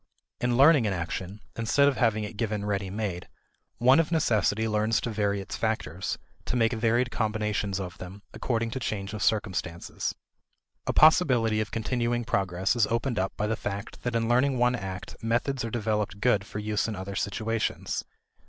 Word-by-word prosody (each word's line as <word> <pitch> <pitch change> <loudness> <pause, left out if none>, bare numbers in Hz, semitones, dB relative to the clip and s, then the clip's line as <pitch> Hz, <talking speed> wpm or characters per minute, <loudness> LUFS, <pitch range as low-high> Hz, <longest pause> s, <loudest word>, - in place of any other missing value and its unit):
In 120 -1 +1
learning 140 -4 +6
an 100 - 0
action, 90 +3 -4
instead 120 +5 +3
of 140 - +2
having 110 -3 +2
it 105 +1 -6
given 105 -1 -2
ready 100 -2 -1
made, 95 -3 -3 0.5
one 130 +5 +5
of 165 0 +1
necessity 110 - +2
learns 110 +1 +1
to 120 - -3
vary 100 -2 0
its 95 - -6
factors, 95 -6 -2 0.3
to - - -2
make 115 -1 +3
varied 115 +2 +1
combinations 105 -3 -1
of 90 -2 -6
them, 95 +3 -9
according 115 -2 -1
to 130 - -3
change 100 -4 -3
of 105 - -5
circumstances. 95 -5 -1 0.7
A - - +2
possibility 125 -9 +5
of 105 - -3
continuing 120 +1 -1
progress 95 -2 0
is 115 -3 +3
opened 115 0 -1
up 95 +1 -2
by 105 - 0
the 110 +1 0
fact 100 -2 -6
that 120 -1 -2
in 115 -1 +1
learning 130 +3 +3
one 125 0 +3
act, 95 -5 -5
methods 120 +3 0
are 115 - -2
developed 105 -3 -1
good 105 -3 +2
for - - -7
use 105 +1 -1
in 110 - -3
other 95 +1 -6
situations. 110 +3 -2
110 Hz, 180 wpm, -27 LUFS, 100-120 Hz, 0.7 s, learning